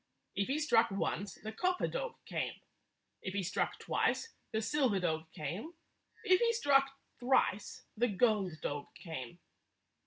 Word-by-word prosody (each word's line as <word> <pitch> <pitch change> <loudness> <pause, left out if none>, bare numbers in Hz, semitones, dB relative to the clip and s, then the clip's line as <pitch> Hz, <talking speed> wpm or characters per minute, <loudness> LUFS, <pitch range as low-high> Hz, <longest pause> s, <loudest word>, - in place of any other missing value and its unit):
If 200 0 +1
he 275 - +1
struck 295 -7 +4
once, 200 0 -2
the 220 - -7
copper 365 +10 +1
dog - - -3
came; - - -2 0.7
if 190 +1 -4
he 200 - 0
struck 185 +2 0
twice, 460 - 0 0.2
the 220 - +1
silver 230 -3 +2
dog 160 -2 -1
came; 185 - -5 0.5
if 370 0 +5
he 465 -1 +3
struck 275 -11 +4 0.3
thrice, 245 -5 +1
the 240 +3 +3
gold 205 -3 +2
dog 145 0 -2
came. 160 -3 -7
220 Hz, 145 wpm, -34 LUFS, 185-295 Hz, 0.7 s, if